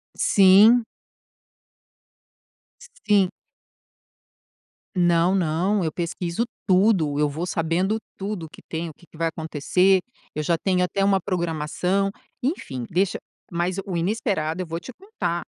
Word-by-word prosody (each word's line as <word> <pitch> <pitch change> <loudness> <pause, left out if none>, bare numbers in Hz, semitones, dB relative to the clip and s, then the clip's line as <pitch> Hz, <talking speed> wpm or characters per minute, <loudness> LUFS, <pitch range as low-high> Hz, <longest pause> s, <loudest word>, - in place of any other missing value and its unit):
Sim. 205 +5 +6 2.2
Sim. 200 -3 +4 1.7
Não, 175 +1 +3
não, 185 +4 +1
eu 160 - -1
pesquiso 170 +5 -2 0.2
tudo, 185 -7 +3
eu 150 -1 +2
vou 160 +5 -4
sabendo 180 +5 0 0.2
tudo 195 -5 -5
que - - -15
tem, 165 +1 -4
o 155 - -11
que 175 - -21
que 160 - -18
vai 165 - +1
acontecer, 165 +4 +2 0.4
eu 155 - -1
já 165 +2 +1
tenho 180 +1 +1
até 195 +2 0
uma 195 -1 +3
programação, 180 +2 -1 0.3
enfim, 140 - -3
deixa 185 +2 0 0.3
mas 175 +2 -1
o 185 -3 -3
inesperado, 185 - -1
eu - - -3
vou 165 +1 -4
te 255 - -10
contar 185 - -4
180 Hz, 125 wpm, -24 LUFS, 165-195 Hz, 2.2 s, Sim